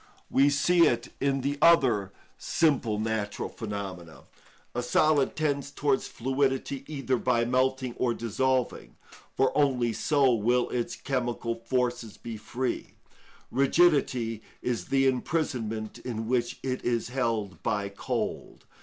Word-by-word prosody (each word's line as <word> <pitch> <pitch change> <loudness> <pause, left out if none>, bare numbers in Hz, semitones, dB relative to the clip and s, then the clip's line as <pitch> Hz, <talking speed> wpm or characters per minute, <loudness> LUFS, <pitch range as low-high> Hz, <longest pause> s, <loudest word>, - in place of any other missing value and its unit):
We 140 +2 +5
see 170 +4 +4
it 120 +1 -1
in 135 0 +1
the 140 +2 -2
other 120 - +4 0.3
simple 135 -9 +1
natural 110 -1 -2
phenomena. 95 -6 -7 0.5
A 120 - -1
solid 145 +3 +2
tends 140 -3 -1
towards 145 -2 0
fluidity 135 +1 -1
either 135 -4 -1
by 120 -1 +1
melting 130 0 +1
or 120 -2 +1
dissolving, 130 +3 -1 0.4
for 135 -1 +2
only 125 -5 +2
so 140 +1 +3
will 120 +3 +2
its 120 -1 -2
chemical 120 -3 -2
forces 120 -1 -2
be 115 -1 -7
free; 120 +4 -4 0.6
rigidity 130 -5 +2 0.2
is 125 -2 -1
the 135 0 +2
imprisonment 125 -5 -1
in 115 -3 -4
which 120 0 0
it 130 -1 -2
is 120 -1 0
held 115 -9 -2
by 105 -2 -1
cold. 100 0 -4
125 Hz, 125 wpm, -28 LUFS, 115-135 Hz, 0.6 s, We